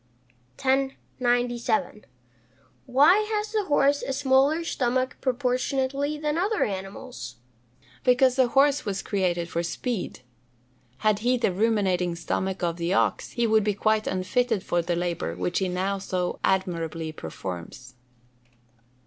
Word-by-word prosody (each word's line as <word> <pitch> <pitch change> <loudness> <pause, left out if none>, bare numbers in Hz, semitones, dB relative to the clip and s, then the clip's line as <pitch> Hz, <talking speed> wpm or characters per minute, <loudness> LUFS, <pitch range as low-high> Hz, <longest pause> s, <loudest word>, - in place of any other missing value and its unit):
"_ - - -12
1097. 245 -4 0 0.8
Why 295 +10 +6 0.2
has 420 0 -2
the 430 -2 0
horse 285 -2 +3
a 270 - -3
smaller 275 +4 +3
stomach 255 -4 0
proportionately 265 +3 0
than 300 +1 -1
other 415 +4 +1
animals? 195 - -6 0.7
Because 255 0 +4
the 260 -2 +4
horse 280 +3 +3
was 195 -2 -3
created 175 -4 0
for 170 0 -2
speed. 185 - -4 0.8
Had 210 -1 +3
he 250 +3 +2
the 235 - +1
ruminating 185 -4 +1
stomach 190 +2 -2
of 170 -1 0
the 170 +2 0
ox, - - 0
he 235 - +1
would 220 -1 +3
be 210 -1 0
quite 215 +1 +1
unfitted 195 +3 0
for 175 - 0
the 175 +1 -1
labour 170 - -2
which 90 0 -1
he 190 - 0
now 190 +2 -1
so 185 -2 -2
admirably 165 -4 -1
performs. 95 - -8
220 Hz, 130 wpm, -26 LUFS, 180-265 Hz, 0.8 s, Why